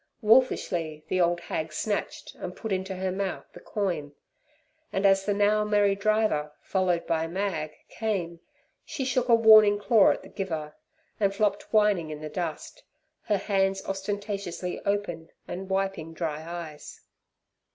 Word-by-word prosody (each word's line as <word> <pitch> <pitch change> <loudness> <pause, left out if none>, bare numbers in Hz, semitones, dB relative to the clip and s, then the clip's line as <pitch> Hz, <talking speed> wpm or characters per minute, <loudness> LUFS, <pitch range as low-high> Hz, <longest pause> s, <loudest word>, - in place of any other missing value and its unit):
Wolfishly 175 -10 +2
the 185 - +2
old 175 0 +2
hag 160 -2 -4
snatched 205 +6 -3
and - - -7
put 220 - -6
into 190 0 -2
her 185 0 -2
mouth 190 0 -3
the - - -11
coin, 170 -8 -3 0.8
and 195 +1 0
as 195 0 +4
the 205 - +1
now 210 +1 +3
merry 205 -1 +3
driver, 200 -8 +1
followed 185 -3 0
by 165 -1 0
Mag, 170 -4 -2 0.2
came, 185 -7 -3 0.4
she 270 - -4
shook 255 -1 0
a 235 - +8
warning 215 -2 +7
claw 210 0 +5
at - - -1
the - - -11
giver, 160 -6 -4 0.4
and 200 -2 +1
flopped 205 -1 0
whining 210 -7 +3
in 150 -1 -6
the 155 0 -6
dust, 175 - -5 0.4
her 205 - +2
hands 195 -1 0
ostentatiously 195 -2 -4
open 175 -5 -2 0.2
and 190 +2 -6
wiping 190 -4 -2
dry 155 -2 -3
eyes. 165 -3 -8
195 Hz, 150 wpm, -27 LUFS, 170-205 Hz, 0.8 s, a